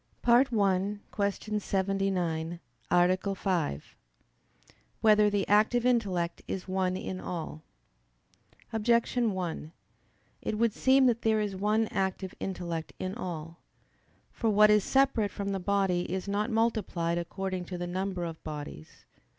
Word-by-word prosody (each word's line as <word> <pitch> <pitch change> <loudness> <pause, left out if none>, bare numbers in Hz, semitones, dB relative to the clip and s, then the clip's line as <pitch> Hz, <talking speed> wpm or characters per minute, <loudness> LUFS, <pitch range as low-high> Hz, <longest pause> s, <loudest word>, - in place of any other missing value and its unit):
_______________________ - - -44 0.2
FIFTH 240 0 +5 0.6
ARTICLE 205 - 0
[I, 200 - +4 0.2
Q. 210 - +1
79, 185 -4 -1 0.3
Art. 180 +1 +4 0.2
5] 170 - -2 1.1
Whether 210 -1 +5
the 205 -1 0
Active 220 +4 +3
Intellect 195 -9 +1
Is 190 -1 -4
One 185 -1 0
in 185 0 -5
All? 160 -4 -5 1.1
Objection 235 +1 +2
1: 170 -4 -4 0.7
It 215 - -2
would 230 -1 +2
seem 265 +2 +4
that 235 -2 +2
there 220 -1 +2
is 205 -2 -2
one 210 +3 +1
active 190 -1 -2
intellect 170 -4 -4
in 185 0 -3
all. 170 -6 -6 0.7
For 225 - -1
what 210 0 +6
is 210 -2 +4
separate 270 -6 +2
from 200 0 -4
the 195 -1 -1
body 190 -2 0
is 190 +1 -3
not 205 +3 0
multiplied 215 -7 0
according 185 +1 -4
to 180 +1 -6
the 175 - -3
number 185 0 -3
of 165 -1 -7
bodies. 145 - -8
195 Hz, 140 wpm, -29 LUFS, 175-215 Hz, 1.1 s, what